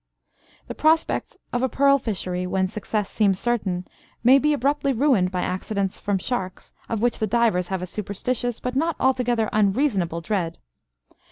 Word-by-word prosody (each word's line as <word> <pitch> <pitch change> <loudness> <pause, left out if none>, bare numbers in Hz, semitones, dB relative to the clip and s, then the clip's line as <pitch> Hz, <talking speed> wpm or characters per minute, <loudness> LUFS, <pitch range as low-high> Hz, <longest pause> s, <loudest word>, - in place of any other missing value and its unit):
The - - -6
prospects 320 +1 +1 0.2
of 245 - 0
a 260 - +1
pearl 275 +3 +4
fishery, 180 -6 -3
when 190 0 +1
success 210 +1 -3
seems 200 -4 +1
certain, 195 -7 -1 0.4
may 260 +3 +7
be 300 +2 +2
abruptly 280 0 +1
ruined 240 -8 +3
by 180 -1 -2
accidents 195 +1 -2
from 205 -1 0
sharks, 190 -2 -4 0.2
of 225 -1 -2
which 240 -1 +1
the 220 - 0
divers 215 -5 +2
have 190 -2 -3
a - - -1
superstitious, 215 +5 -3
but 250 0 -4
not 325 +3 +1
altogether 245 -4 +2
unreasonable, 200 - +1
dread. 170 -2 -2
215 Hz, 160 wpm, -23 LUFS, 190-255 Hz, 0.4 s, may